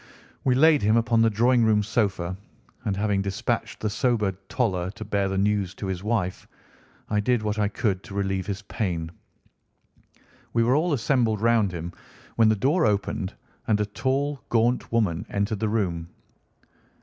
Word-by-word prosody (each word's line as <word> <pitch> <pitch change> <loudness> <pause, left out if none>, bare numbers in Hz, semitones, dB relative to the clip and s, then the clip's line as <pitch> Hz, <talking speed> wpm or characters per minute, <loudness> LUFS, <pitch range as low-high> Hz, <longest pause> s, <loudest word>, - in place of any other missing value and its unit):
We 130 -2 +3
laid 155 +2 +5
him 110 +3 +3
upon 115 0 +3
the 115 - +5
drawing 120 +3 +3
room 110 -2 +3
sofa, 100 -5 -1 0.5
and 100 -2 -1
having 100 -1 +1
dispatched 95 -1 -2
the 110 - 0
sobered 105 -4 +1
Toller 95 -8 0
to 110 +2 -8
bear 100 -2 0
the 95 - -2
news 100 -1 0
to - - -6
his 95 -1 -3
wife, 105 -5 -2 0.6
I 105 - +2
did 115 +1 +1
what 105 0 -1
I 105 - +2
could 100 -2 -1
to 100 - -9
relieve 95 -2 -1
his 100 0 -4
pain. 85 -6 -3 1.4
We 115 - +3
were 120 +2 +3
all 165 +4 +1
assembled 115 -4 +1
round 115 -3 +3
him 85 0 -6 0.4
when 115 -1 +5
the 110 - +3
door 145 - +2
opened, 100 -1 -1 0.3
and 105 -2 +2
a 105 - +1
tall, 135 +5 -1
gaunt 120 +2 +1
woman 105 -8 +1
entered 100 +1 -1
the 110 0 0
room. 85 -6 -1
105 Hz, 170 wpm, -25 LUFS, 95-115 Hz, 1.4 s, laid